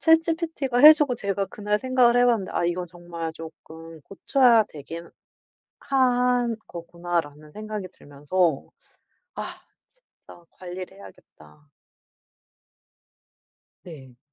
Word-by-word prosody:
ChatGPT가 325 -5 +1
해주고 295 -2 +7
제가 200 -2 -2
그날 210 +2 -2
생각을 255 -2 +3
해봤는데 240 -5 +2
'아 - - -1
이건 175 +1 -2
정말 170 -1 -7
쪼끔 160 0 -12
고쳐야 235 - +3
되긴 165 +3 -10 0.7
한 250 -3 +1
거구나.'라는 170 -3 -5
생각이 215 -1 -6
들면서 145 +2 -2 0.7
'아 - - -4 0.8
진짜 175 - -16
관리를 185 +1 -9
해야겠다.' 75 - -17 2.2
네. 135 -8 -13
185 Hz, 240 characters per minute, -24 LUFS, 165-245 Hz, 2.2 s, 해주고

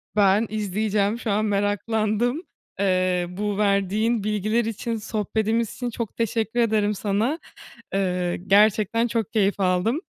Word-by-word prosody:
Ben 205 +1 +4
izleyeceğim, 210 +1 -1
şu 225 - -2
an 210 +2 +1
meraklandım. 215 - 0 0.4
Eee, 185 -2 +1
bu 200 +2 -3
verdiğin 205 +2 +1
bilgiler 215 +2 0
için, 230 +1 -3
sohbetimiz 220 +1 -1
için 245 -1 -3
çok 230 -3 -5
teşekkür 225 +1 -1
ederim 215 -3 +2
sana. 215 - -1 0.5
Eee, 180 -2 0
gerçekten 215 +3 +4
çok 230 -2 -2
keyif 205 -2 +1
aldım. 190 - +1
210 Hz, 125 wpm, -24 LUFS, 200-225 Hz, 0.5 s, Ben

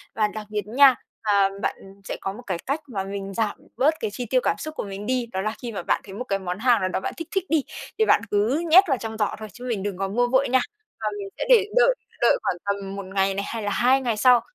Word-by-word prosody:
Và 215 -1 +2
đặc 215 0 -7
biệt 210 -1 -3
nha, 265 +3 +6 0.3
ờ, 210 -1 +1 0.3
bạn - - 0 0.3
sẽ - - -5
có 195 - -3
một 230 - -10
cái 185 -3 -1
cách 285 +4 -1
mà 200 -7 -3
mình 195 0 -5
giảm 215 0 -1 0.2
bớt 295 +5 +4
cái 215 - -2
chi 245 - -4
tiêu 255 +3 +2
cảm - - +1
xúc 310 0 -6
của - - -3
mình 200 0 -7
đi, 255 +1 0
đó 190 - -2
là 215 +2 -1
khi 240 -2 -5
mà 195 - -5
bạn - - +1
thấy 195 - -10
một 225 +6 -4
cái 195 -5 -1
món 180 0 -4
hàng 240 -1 +4
nào 185 - 0
đó 185 - -1
bạn - - -4
thích 330 - -6
thích 385 -3 0
đi 310 -3 +2 0.4
thì 440 - +5
bạn 210 - +4
cứ 225 +11 +1
nhét 365 +5 +9
vào 270 -4 +2
trong 220 -1 -6
giỏ 210 - 0
thôi 215 - -6
chứ 245 - -10
mình 215 -5 -2
đừng 200 -2 -3
có 195 +1 -1
mua 240 +5 +1
vội 260 +1 +2
nha. 260 - +4 0.4
Và 215 - -1
mình 200 - -5
sẽ - - -2
để 450 -5 +7
đợi - - +5 0.3
đợi - - +5
khoảng 175 - 0
tầm 200 -1 -3
1 200 -1 -6
ngày 195 0 +2
này 200 +1 -3
hay 230 -1 -4
là 205 - -1
2 255 +5 +3
ngày 235 -4 -1
sau. 245 +2 +6
220 Hz, 290 wpm, -24 LUFS, 200-260 Hz, 0.4 s, nhét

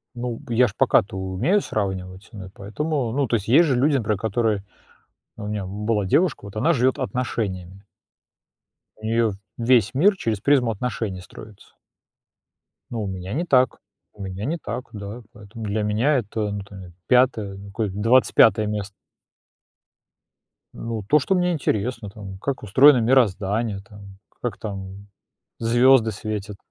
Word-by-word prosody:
Ну, 120 0 -4
я 125 +2 +4
ж 100 - -8
пока-то 95 -3 +2
умею 95 - +1
сравнивать, 95 -1 -4
ну 100 -3 -8
и - - -11
поэтому 125 +5 -3
Ну, 140 +1 0
то 115 - +1
есть, 105 -1 -2
есть 150 +9 +6
же 140 -5 +1
люди, 140 +3 +3
например, 105 -4 -1
которые 110 -2 0 0.7
У 105 -2 -7
меня 105 -2 -3
была 105 +1 -1
девушка, 155 - +1
вот 100 +1 -10
она 160 +10 +3
живет 130 -2 +2
отношениями. 95 -5 -3 1.1
У 110 - -20
неё 115 -1 +1 0.2
весь 115 -2 +3
мир 195 +8 +4
через 115 - -2
призму 130 0 +3
отношений 105 -4 -4
строится. 105 +3 -14 1.2
Ну, 115 -2 -3
у 100 - -3
меня 95 +1 -5
не 170 +5 -1
так, 130 -5 +3 0.4
у 105 - -13
меня 95 +2 -5
не 165 +4 -1
так, 125 -3 -5
да, 105 +3 -7
поэтому 105 +1 -10
для 105 +1 -1
меня 115 +8 +2
это 105 -2 -2
ну 100 0 -4
там 100 -1 -12
я, 90 - -11 0.2
5, 125 -6 +2
ну 100 - -11
какое, 105 +1 -2
25 110 0 +4
место. 105 -1 -3 1.8
Ну, 115 -2 -5
то, 150 +4 +5
что 185 +8 0
мне 180 0 +1
интересно 115 -7 -2
там, 100 -2 -9
как 140 +5 -3
устроено 130 +7 +6
мироздание 110 -3 +1
там, 100 -2 -13 0.2
как 120 -5 -3
там 100 -1 -7 0.5
звёзды 120 0 +4
светят. 105 -1 -5
110 Hz, 155 wpm, -23 LUFS, 100-125 Hz, 1.8 s, есть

